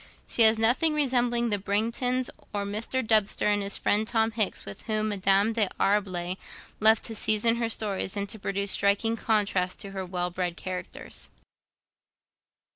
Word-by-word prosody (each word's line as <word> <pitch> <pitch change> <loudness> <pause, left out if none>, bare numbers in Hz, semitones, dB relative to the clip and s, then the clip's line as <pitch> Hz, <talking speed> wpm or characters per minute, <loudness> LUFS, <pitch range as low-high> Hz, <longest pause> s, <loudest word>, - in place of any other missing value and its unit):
She - - +2
has 220 0 +7
nothing 250 +8 +3
resembling 245 -4 +1
the 205 - +1
Brangtons, 230 +5 -1 0.2
or 200 -1 -2
Mr. 225 +5 -3
Dubster 215 -2 +2
and 205 - -1
his 200 0 0
friend 215 +1 +1
Tom 225 -1 +1
Hicks, 215 -3 -1
with 100 - -9
whom 215 -1 -1
Madame 200 +2 +2
D'Arblay 195 -4 -1 0.4
loved 220 +1 +5
to 225 - -4
season 220 +2 +3
her 230 -1 -1
stories, 205 -3 -3
and 200 0 -2
to 220 - -5
produce 200 0 -2
striking 200 +3 +1
contrasts 200 -5 0
to 200 - -7
her 190 -1 -5
well 180 -1 -3
bred 175 -1 -3
characters. 185 -1 -7
210 Hz, 155 wpm, -26 LUFS, 195-225 Hz, 0.4 s, has